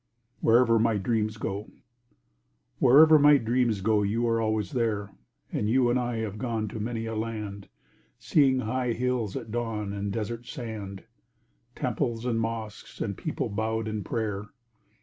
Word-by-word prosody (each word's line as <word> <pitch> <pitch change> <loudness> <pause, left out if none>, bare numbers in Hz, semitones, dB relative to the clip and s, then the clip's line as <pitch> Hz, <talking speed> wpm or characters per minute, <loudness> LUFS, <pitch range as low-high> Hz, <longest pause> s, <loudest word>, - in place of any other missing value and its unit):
[WHEREVER 115 0 +4
MY 115 -1 +2
DREAMS 110 +1 -1
GO] 100 0 -4 1.1
Wherever 155 +5 +7
my 145 0 +7
dreams 120 -4 +1
go, 105 +1 +2
you 110 +4 0
are 115 0 +1
always 110 -3 -1
there, 105 -4 -1 0.4
And 105 - -1
you 125 0 +3
and 125 - +2
I 120 -1 -2
have 105 -1 -4
gone 115 -4 -2
to 110 - -6
many 115 +1 -3
a 115 - -4
land, 105 -3 -5 0.5
Seeing 135 -4 +3
high 125 +1 -1
hills 120 -4 -1
at 110 - -6
dawn 110 -3 -2
and 100 0 -3
desert 115 +3 -4
sand, 105 -5 -6 0.7
Temples 120 -2 -2
and 115 -2 0
mosques 110 -2 -5
and - - -2
people - - -3
bowed 110 +2 -2
in 110 -1 -3
prayer. 105 -5 -3
115 Hz, 150 wpm, -27 LUFS, 105-120 Hz, 1.1 s, Wherever